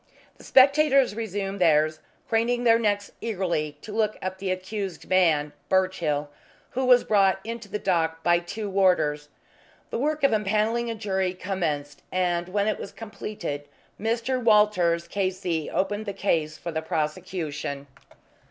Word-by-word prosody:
The -, -, -14 dB
spectators 275 Hz, -1 st, +5 dB
resumed 200 Hz, -3 st, -4 dB
theirs, 155 Hz, -2 st, +3 dB, 0.3 s
craning 235 Hz, +2 st, +1 dB
their 230 Hz, -1 st, +5 dB
necks 205 Hz, -2 st, 0 dB
eagerly 175 Hz, -9 st, -2 dB
to 215 Hz, -, -8 dB
look 215 Hz, 0 st, 0 dB
at 185 Hz, 0 st, -5 dB
the 195 Hz, -, -3 dB
accused 190 Hz, 0 st, -4 dB
man, 160 Hz, -6 st, +3 dB, 0.2 s
Birchill, 165 Hz, -6 st, 0 dB, 0.4 s
who 260 Hz, +1 st, -1 dB
was 250 Hz, -1 st, +6 dB
brought 195 Hz, -3 st, +3 dB
into 230 Hz, -1 st, -6 dB
the 210 Hz, -, -2 dB
dock 165 Hz, -4 st, 0 dB
by 175 Hz, 0 st, +4 dB
two 200 Hz, +5 st, -5 dB
warders. 160 Hz, -7 st, +2 dB, 0.6 s
The -, -, -2 dB
work 305 Hz, +3 st, -1 dB
of 275 Hz, -, +5 dB
empanelling 215 Hz, +3 st, +1 dB
a 230 Hz, -, -3 dB
jury 190 Hz, -4 st, -1 dB
commenced, 155 Hz, -7 st, -3 dB
and 175 Hz, -1 st, 0 dB
when 200 Hz, +2 st, 0 dB
it 215 Hz, -, 0 dB
was 195 Hz, -, -7 dB
completed 200 Hz, -9 st, -6 dB, 0.3 s
Mr. 235 Hz, +3 st, -1 dB
Walters, 210 Hz, -6 st, +3 dB
K.C., 185 Hz, -4 st, -2 dB
opened 205 Hz, +3 st, -1 dB
the 200 Hz, -, -2 dB
case 160 Hz, -6 st, 0 dB
for 170 Hz, +2 st, -5 dB
the 160 Hz, 0 st, -2 dB
prosecution. 155 Hz, -3 st, -3 dB
190 Hz, 145 wpm, -25 LUFS, 170-215 Hz, 0.6 s, was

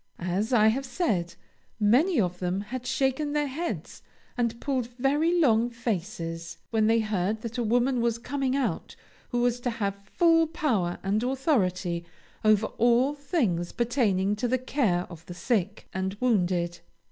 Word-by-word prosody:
As 185 Hz, +6 st, -2 dB
I 220 Hz, -3 st, +5 dB
have 265 Hz, +5 st, 0 dB
said, 195 Hz, -, -1 dB, 0.4 s
many 255 Hz, -, +4 dB
of 180 Hz, -3 st, 0 dB
them 180 Hz, +2 st, -1 dB
had 250 Hz, +4 st, -6 dB
shaken 275 Hz, +2 st, 0 dB
their 295 Hz, 0 st, +1 dB
heads 310 Hz, +5 st, -5 dB, 0.3 s
and 235 Hz, -2 st, -1 dB
pulled 260 Hz, -4 st, -1 dB
very 295 Hz, +7 st, +2 dB
long 235 Hz, -6 st, +4 dB
faces 175 Hz, -8 st, -4 dB
when 220 Hz, -1 st, +2 dB
they 225 Hz, 0 st, +4 dB
heard 215 Hz, 0 st, -1 dB
that 230 Hz, +1 st, -5 dB
a -, -, +1 dB
woman 245 Hz, +3 st, +2 dB
was 235 Hz, -1 st, +1 dB
coming 270 Hz, +2 st, -2 dB
out 245 Hz, -11 st, -2 dB, 0.3 s
who 245 Hz, -1 st, 0 dB
was 245 Hz, 0 st, +1 dB
to 245 Hz, -, -2 dB
have 205 Hz, -4 st, -1 dB, 0.2 s
full 330 Hz, -1 st, +4 dB
power 235 Hz, -, 0 dB
and 200 Hz, +3 st, +1 dB
authority 205 Hz, -, 0 dB, 0.4 s
over 215 Hz, 0 st, +4 dB
all 245 Hz, +4 st, +4 dB
things 245 Hz, -, -1 dB
pertaining 215 Hz, -5 st, +1 dB
to 245 Hz, -, 0 dB
the 255 Hz, +2 st, +2 dB
care 235 Hz, -9 st, 0 dB
of 170 Hz, -2 st, -11 dB
the 175 Hz, -, -7 dB
sick 190 Hz, +1 st, -1 dB
and 190 Hz, +1 st, -2 dB
wounded. 180 Hz, -7 st, +1 dB
230 Hz, 160 wpm, -27 LUFS, 190-260 Hz, 0.4 s, I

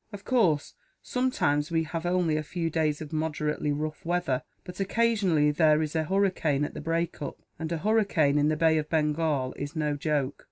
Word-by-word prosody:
Of 205 Hz, -1 st, -9 dB
course, 180 Hz, -, +2 dB, 0.3 s
sometimes 150 Hz, -, 0 dB
we 165 Hz, -1 st, +1 dB
have 165 Hz, +2 st, -4 dB
only 175 Hz, -3 st, +1 dB
a 155 Hz, -, 0 dB
few 165 Hz, +2 st, -3 dB
days 155 Hz, -2 st, 0 dB
of 155 Hz, 0 st, -7 dB
moderately 150 Hz, -1 st, -1 dB
rough 155 Hz, +1 st, -3 dB
weather; 175 Hz, -6 st, 0 dB, 0.2 s
but 180 Hz, +1 st, -10 dB
occasionally 195 Hz, -8 st, +2 dB
there 155 Hz, 0 st, +3 dB
is 155 Hz, +1 st, -5 dB
a 160 Hz, -1 st, +1 dB
hurricane 180 Hz, -6 st, +1 dB
at -, -, -7 dB
the -, -, -6 dB
break 165 Hz, +2 st, -2 dB
up, 145 Hz, -, -5 dB, 0.2 s
and 160 Hz, 0 st, -4 dB
a 170 Hz, -, 0 dB
hurricane 180 Hz, -7 st, +2 dB
in 145 Hz, -, +3 dB
the 155 Hz, 0 st, +1 dB
bay 160 Hz, 0 st, +3 dB
of 150 Hz, -, -5 dB
Bengal 150 Hz, -4 st, 0 dB
is 145 Hz, +3 st, -5 dB
no 150 Hz, -2 st, 0 dB
joke. 145 Hz, -2 st, -1 dB
155 Hz, 195 wpm, -27 LUFS, 150-175 Hz, 0.3 s, there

